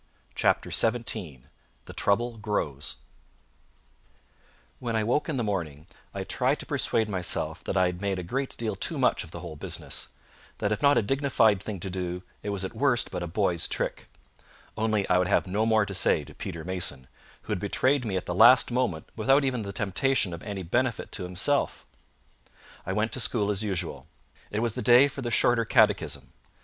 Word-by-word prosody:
CHAPTER - - +1
XVII 110 - -1 0.4
The - - -10
Trouble 115 +3 +1
Grows 75 -10 -2 1.8
When 120 -2 -3
I 110 - +1
woke 135 +8 0
in 150 - -1
the 120 - 0
morning, 80 -8 -3 0.3
I - - -4
tried - - 0
to - - -8
persuade 110 -1 0
myself 90 -4 -1
that - - -1
I 95 - +4
had 90 0 -3
made 100 -2 -1
a 90 - -4
great 130 +9 -3
deal 110 -3 -2
too - - -1
much - - +2
of - - -12
the - - -8
whole 80 - -7
business; 75 - -4 0.5
that 105 - -1
if 105 - -1
not 145 0 +5
a - - +3
dignified 115 -5 +2
thing 100 -2 -5
to 95 - -4
do, 90 -1 -4 0.2
it 105 - -4
was 100 -2 -1
at - - -7
worst 135 -4 +1
but - - -4
a 85 - -3
boy's 90 -1 0
trick; - - -4 0.7
only 110 -2 0
I 90 - +4
would 90 - +1
have - - +2
no 105 +4 0
more 110 -2 +4
to 100 - -6
say 90 - +2
to - - -13
Peter 85 -4 -6
Mason, 90 -8 -1 0.4
who - - -7
had - - 0
betrayed 130 +7 +1
me 100 -5 -1
at 90 - -4
the 90 - -2
last 125 +8 +7
moment 120 -11 -1
without 135 +6 +3
even 125 -3 0
the 100 -1 -5
temptation 105 +1 0
of 85 - -7
any 100 -3 -5
benefit 120 +7 -1
to 90 - -3
himself. 90 +11 0 1.0
I - - -1
went 105 +3 0
to - - -2
school 105 -4 +1
as 100 0 -2
usual. 95 -5 -3 0.4
It 105 - -2
was 115 -2 0
the - - -4
day 120 +5 +7
for 140 0 -7
the 120 - -2
Shorter 120 0 +3
Catechism. 110 - +2
105 Hz, 195 wpm, -27 LUFS, 90-120 Hz, 1.8 s, last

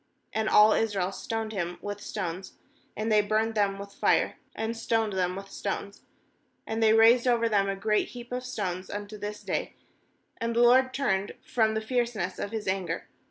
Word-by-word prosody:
And 220 0 0
all 215 +1 +7
Israel 195 -4 0
stoned 225 +2 -4
him 175 -4 -3
with 205 +2 -6
stones; 185 -2 -5 0.4
and 220 +1 -1
they 210 -1 +6
burned 215 +2 0
them 200 -2 +1
with 200 0 -9
fire, - - +2 0.2
and 220 +1 -2
stoned 225 -2 0
them 180 -1 0
with 195 0 -8
stones. 200 0 -4 0.7
26And 220 +1 -2
they 220 -1 +5
raised 230 +3 +6
over 235 -1 +3
him 200 -3 +2
a 195 - -1
great 210 +2 +1
heap 240 -1 -10
of 250 0 -3
stones, 190 -7 -4
unto 205 +1 -6
this 210 0 -6
day; - - -3 0.6
and 230 0 -2
the 235 - +4
LORD 255 +2 +6
turned 200 -8 0
from 220 -2 +1
the 220 - 0
fierceness 235 -5 -1
of - - -3
His 220 -1 -5
anger. 190 -1 -2
215 Hz, 185 wpm, -28 LUFS, 195-225 Hz, 0.7 s, all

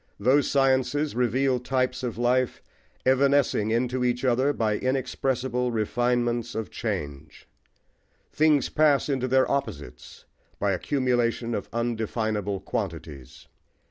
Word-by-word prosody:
Those 130 +7 +3
sciences 135 +1 +1
reveal 125 +2 +1
types 130 0 -1
of 120 -4 -4
life 125 +1 0 0.4
evanescing 135 -4 +3
into 125 +2 0
each 125 +1 0
other 130 +3 +2
by 110 -6 0
inexpressible 130 -1 -1
refinements 120 +1 0
of 110 -4 -4
change. 75 0 -5 0.8
Things 150 -2 +3
pass 150 -2 +2
into 130 -2 0
their 130 +1 +3
opposites 75 - -5 0.3
by 100 0 +1
accumulation 120 +2 0
of 105 - -4
undefinable 110 -3 -2
quantities. 80 - -6
125 Hz, 110 wpm, -26 LUFS, 110-130 Hz, 0.8 s, Those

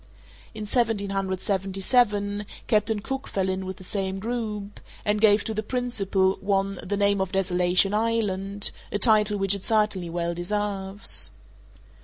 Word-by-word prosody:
In 215 - -6
1777, 200 0 0 0.2
Captain 210 -1 +1
Cook 270 +4 -4
fell 190 -1 -1
in 190 0 -2
with 190 0 -6
the - - -12
same 190 0 -2
group, 210 -2 -4 0.3
and 210 0 +1
gave 210 -1 +5
to 220 - -3
the 215 - -2
principal 205 -5 0
one 195 -1 0
the 205 +2 -3
name 200 -1 +2
of 190 -1 -2
Desolation 185 +1 +3
Island, 205 -3 0 0.2
a - - 0
title 210 -2 +4
which 195 0 +3
it 200 -2 -4
certainly 210 -5 +1
well 170 0 -2
deserves. 195 +2 +1
200 Hz, 140 wpm, -25 LUFS, 190-210 Hz, 0.3 s, gave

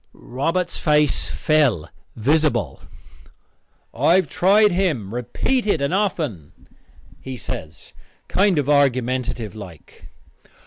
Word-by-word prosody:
Robert's 165 +8 -3
face 150 -2 +1
fell 135 - +1 0.3
visible. 150 +6 0 1.1
"I 170 - +3
have 190 - +2
tried 205 +3 +3
him 155 - -1
repeated 200 - -1
and 140 +4 -1
often," 155 - -2 0.7
he 130 -1 -7
says, 80 -7 -8 0.3
kind 195 -2 +2
of 145 -2 0
argumentative 125 -5 0
like. 95 -8 -13
145 Hz, 95 wpm, -21 LUFS, 120-175 Hz, 1.1 s, I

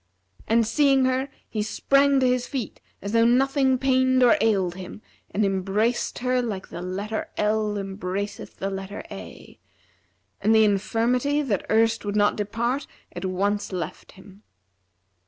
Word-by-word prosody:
And 230 +1 +3
seeing 270 +2 +3
her 260 +2 0 0.2
he 215 - -3
sprang 275 +5 +3
to - - +3
his 250 0 0
feet 260 -6 -5 0.2
as 200 - -4
though 230 0 +4
nothing 265 +2 +3
pained 260 0 +3
or 240 - +6
ailed 195 -6 +2
him 190 +3 -9 0.3
and 210 +1 0
embraced 195 +5 0
her 250 0 +2
like 210 -5 -5
the 175 - -7
letter 200 +4 -4
L 210 0 0
embraceth 195 0 -5
the 195 +1 -3
letter 195 +1 -6
A;[FN#345] - - -11 0.8
and 220 +2 +3
the 220 - +6
infirmity, 235 +8 +1
that 210 -9 -2
erst 225 +1 +2
would 205 0 -3
not 205 0 +3
depart 235 +6 -2 0.3
at 175 - -4
once 200 +3 -1
left 175 -4 -6
him. 195 +1 -16
220 Hz, 150 wpm, -24 LUFS, 200-250 Hz, 0.8 s, or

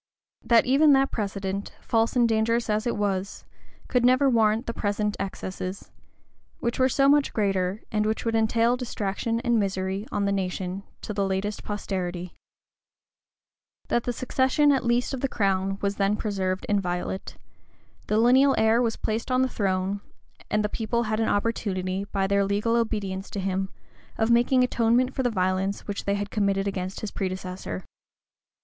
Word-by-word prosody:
That 230 -1 +4
even 285 +3 +5
that 270 0 +3
precedent, 200 -1 -3
false 225 +1 0
and 240 -2 +4
dangerous 230 +1 +1
as 215 +2 0
it 235 - -1
was, 200 -1 -2 0.4
could 250 -2 +1
never 255 +3 +5
warrant 225 0 +2
the 230 - -3
present 210 0 -1
excesses; 190 -1 -5 0.7
which 235 +1 -2
were 260 0 +4
so 275 +2 +3
much 290 0 +4
greater, 195 -1 0
and 210 -1 +1
which 220 +2 -2
would 230 - 0
entail 225 +2 +3
distraction 230 -2 -2
and 240 -2 +2
misery 195 +1 -2
on 205 -1 0
the 200 - +1
nation, 185 -1 -2 0.2
to 210 - -4
the 200 -1 0
latest 195 +2 -2
posterity. 180 -4 -4 1.6
That 240 - +1
the 245 - 0
succession, 260 +4 +2
at 270 - +1
least, 240 +2 +1
of 265 - -3
the 275 - +1
crown, 195 -4 0
was 200 0 0
then 200 +1 +2
preserved 190 -3 -2
inviolate: 190 -2 -2 0.7
the 210 - +1
lineal 260 +4 +5
heir 220 +2 +4
was 230 -2 0
placed 220 +3 -3
on 255 0 +3
the - - +2
throne; 195 -2 -1 0.5
and 210 0 +1
the - - +2
people 235 +2 -1
had 215 -1 -1
an 225 - +1
opportunity, 195 -3 -1
by 195 -1 -1
their 200 +1 +2
legal 205 +4 +1
obedience 205 -4 -2
to 200 - -5
him, 190 0 -1 0.5
of 220 +1 +2
making 245 +2 +4
atonement 245 +1 +2
for - - -1
the 245 - +1
violence 190 -1 0
which 200 -1 -5
they 200 - +1
had 205 0 -4
committed 200 -1 +1
against 190 -1 -4
his 215 - -4
predecessor. 185 - -4
210 Hz, 170 wpm, -26 LUFS, 195-235 Hz, 1.6 s, even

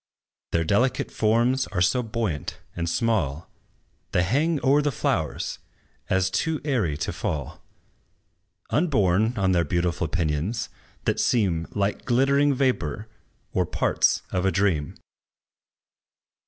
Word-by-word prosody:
Their 85 - +2
delicate 110 +10 +1
forms 120 +4 +2
are 95 - -3
so 90 +8 +3
buoyant 110 - -3 0.2
and 85 -1 -2
small, 85 -5 -1 0.6
They 90 - +3
hang 145 - +1
o'er 140 +3 +5
the 145 0 0
flowers, - - -2 0.5
as 95 0 +2
too 160 -2 0
airy 110 - 0
to - - -3
fall, 70 -4 -4 1.1
Upborne 110 - +2
on 95 -2 +2
their 85 -2 +3
beautiful 85 +1 0
pinions, 85 +6 -1 0.4
that - - +1
seem 90 -8 +1
Like 100 0 -1
glittering 140 +3 +3
vapor, 110 - -1 0.4
or - - +1
parts - - +1
of 90 - 0
a 95 - +2
dream. 90 -8 0
100 Hz, 120 wpm, -25 LUFS, 85-125 Hz, 1.1 s, o'er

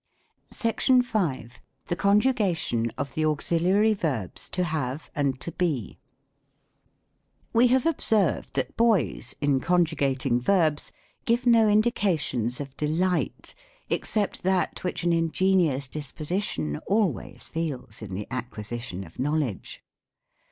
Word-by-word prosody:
SECTION 250 +3 +2
V. 185 - -1 0.4
THE 175 - -2
CONJUGATION 200 - +2
OF 140 -1 -4
THE 155 - -1
AUXILIARY 175 +8 +2
VERBS 140 - -3
To 180 - 0
HaVE 150 -4 -3
AND 140 -3 0
To 170 - -4
Be. 150 - -2 1.5
We 235 +2 +5
have 255 +1 +2
observed 220 - +1
that - - -2
boys, 225 -7 +1
in 145 -2 +2
conjugating 140 -6 +1
verbs, 155 -1 +1 0.3
give 240 +2 +1
no 230 -3 +5
indications 190 - +1
of 140 -2 -7
delight, 175 +5 -1 0.4
except 210 -2 +1
that 185 0 0
which 180 - -2
an 175 -1 +2
in 165 0 +1
genious 170 -7 +2
disposition 150 - -3
always 205 -3 -1
feels 130 -9 -4
in 100 -4 -6
the 105 +2 -4
acquisition 120 -5 -5
of 85 +3 -15
knowledge. 140 - -2
165 Hz, 115 wpm, -26 LUFS, 130-200 Hz, 1.5 s, We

